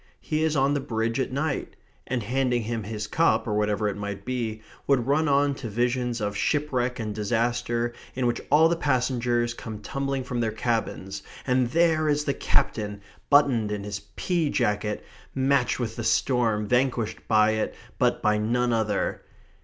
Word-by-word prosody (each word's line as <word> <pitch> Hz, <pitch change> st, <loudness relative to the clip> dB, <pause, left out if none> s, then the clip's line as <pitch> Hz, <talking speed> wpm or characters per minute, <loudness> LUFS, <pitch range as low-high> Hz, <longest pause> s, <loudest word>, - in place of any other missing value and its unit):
He 155 Hz, 0 st, -1 dB
is 160 Hz, -1 st, +1 dB
on 135 Hz, +1 st, +3 dB
the 145 Hz, -, +1 dB
Bridge 115 Hz, -1 st, -1 dB
at 130 Hz, -, -1 dB
night," 140 Hz, +1 st, -2 dB, 0.3 s
and, 125 Hz, -3 st, -1 dB
handing 125 Hz, +1 st, 0 dB
him 115 Hz, +1 st, -2 dB
his 105 Hz, 0 st, -4 dB
cup, 165 Hz, +10 st, +2 dB
or 105 Hz, -, 0 dB
whatever 105 Hz, 0 st, +1 dB
it 100 Hz, -, -2 dB
might 100 Hz, -1 st, -5 dB
be, 115 Hz, -4 st, -3 dB, 0.2 s
would 135 Hz, -4 st, +3 dB
run 150 Hz, +4 st, +2 dB
on 140 Hz, 0 st, +3 dB
to 130 Hz, -4 st, -6 dB
visions 120 Hz, +2 st, 0 dB
of 105 Hz, -1 st, -2 dB
shipwreck 125 Hz, -2 st, 0 dB
and 110 Hz, -2 st, -3 dB
disaster, 120 Hz, +2 st, 0 dB, 0.2 s
in 130 Hz, -1 st, 0 dB
which 120 Hz, -, 0 dB
all 155 Hz, +3 st, +6 dB
the 170 Hz, -, +1 dB
passengers 125 Hz, -5 st, +1 dB
come 110 Hz, -2 st, -7 dB
tumbling 135 Hz, +5 st, -3 dB
from 125 Hz, -1 st, -3 dB
their 115 Hz, -2 st, 0 dB
cabins, 110 Hz, -4 st, -2 dB, 0.2 s
and 125 Hz, -1 st, +2 dB
there 160 Hz, +1 st, +3 dB
is 145 Hz, 0 st, +2 dB
the 140 Hz, -, 0 dB
captain, 105 Hz, -5 st, 0 dB, 0.3 s
buttoned 135 Hz, -7 st, +4 dB
in 105 Hz, -1 st, -3 dB
his 100 Hz, -1 st, -4 dB, 0.2 s
pea 170 Hz, -5 st, 0 dB
jacket, 105 Hz, -4 st, -1 dB, 0.3 s
matched 135 Hz, -2 st, +2 dB
with 115 Hz, -3 st, -3 dB
the 115 Hz, -, -4 dB
storm, 115 Hz, -3 st, +2 dB
vanquished 125 Hz, -2 st, +1 dB
by 110 Hz, -1 st, +4 dB
it 110 Hz, 0 st, -1 dB, 0.2 s
but -, -, +2 dB
by 105 Hz, 0 st, +3 dB
none 120 Hz, +3 st, +1 dB
other. 110 Hz, -3 st, 0 dB
120 Hz, 175 wpm, -26 LUFS, 110-135 Hz, 0.3 s, all